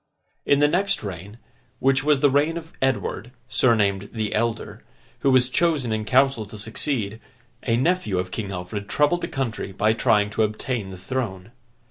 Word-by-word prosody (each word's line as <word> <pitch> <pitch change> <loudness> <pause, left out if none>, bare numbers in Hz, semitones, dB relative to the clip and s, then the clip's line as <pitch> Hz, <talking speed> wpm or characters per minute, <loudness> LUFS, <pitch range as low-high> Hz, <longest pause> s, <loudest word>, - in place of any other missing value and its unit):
In 140 - +5
the 145 - +6
next 195 - +1
reign, 100 +2 -7 0.4
which 135 0 +2
was 145 -2 +3
the 145 - +5
reign 150 +4 +2
of 165 -1 -9
Edward, 125 -3 -1 0.2
surnamed 100 -6 +2
The 110 -3 -2
Elder, 115 +1 -2 0.4
who 140 - +2
was 130 -1 +4
chosen 140 -4 +1
in 110 0 -2
council 130 -1 +3
to 105 - -10
succeed, 110 0 -2 0.4
a 115 - +1
nephew 135 - +1
of 90 0 -2
King 105 -3 -4
Alfred 95 +3 -5
troubled 150 +4 +2
the - - -2
country 120 -6 -3
by 105 +3 +2
trying 105 -2 +2
to 105 - -1
obtain 110 0 -1
the 95 - -8
throne. 95 -2 -4
115 Hz, 170 wpm, -24 LUFS, 105-135 Hz, 0.4 s, the